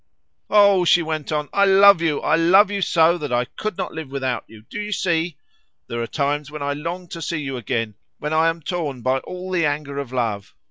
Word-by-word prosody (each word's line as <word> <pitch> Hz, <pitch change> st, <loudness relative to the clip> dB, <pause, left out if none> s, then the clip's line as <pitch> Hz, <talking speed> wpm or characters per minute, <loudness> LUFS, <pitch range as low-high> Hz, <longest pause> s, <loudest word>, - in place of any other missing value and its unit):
"Oh," 200 Hz, -3 st, +5 dB
she 175 Hz, 0 st, +4 dB
went 155 Hz, -2 st, -4 dB
on, 150 Hz, -1 st, -1 dB
"I 200 Hz, 0 st, +4 dB
love 195 Hz, -2 st, +6 dB
you! 160 Hz, -3 st, 0 dB
I -, -, +2 dB
love 190 Hz, +5 st, +5 dB
you 200 Hz, -1 st, -2 dB
so 170 Hz, -1 st, +3 dB
that 145 Hz, -4 st, -5 dB
I 120 Hz, 0 st, +1 dB
could 215 Hz, +8 st, -6 dB
not -, -, -4 dB
live 160 Hz, -4 st, -7 dB
without 130 Hz, -3 st, -2 dB
you, 110 Hz, -1 st, -15 dB
do 210 Hz, -, -5 dB
you 210 Hz, 0 st, -5 dB
see? 170 Hz, -5 st, -1 dB, 0.5 s
There 120 Hz, 0 st, -4 dB
are 115 Hz, -, -3 dB
times 145 Hz, +1 st, -2 dB
when 150 Hz, -1 st, -6 dB
I 145 Hz, 0 st, -1 dB
long 170 Hz, +5 st, -5 dB
to 165 Hz, -, -7 dB
see 165 Hz, +1 st, -2 dB
you 135 Hz, -2 st, -4 dB
again, 115 Hz, -2 st, -3 dB, 0.2 s
when 150 Hz, +1 st, -4 dB
I 160 Hz, +1 st, +4 dB
am 165 Hz, -1 st, -5 dB
torn 150 Hz, -8 st, -4 dB
by 130 Hz, +2 st, +1 dB
all 180 Hz, +5 st, -8 dB
the 175 Hz, -2 st, +1 dB
anger 145 Hz, -1 st, -3 dB
of 135 Hz, -3 st, -6 dB
love. 115 Hz, -6 st, -3 dB
155 Hz, 230 wpm, -21 LUFS, 140-180 Hz, 0.5 s, love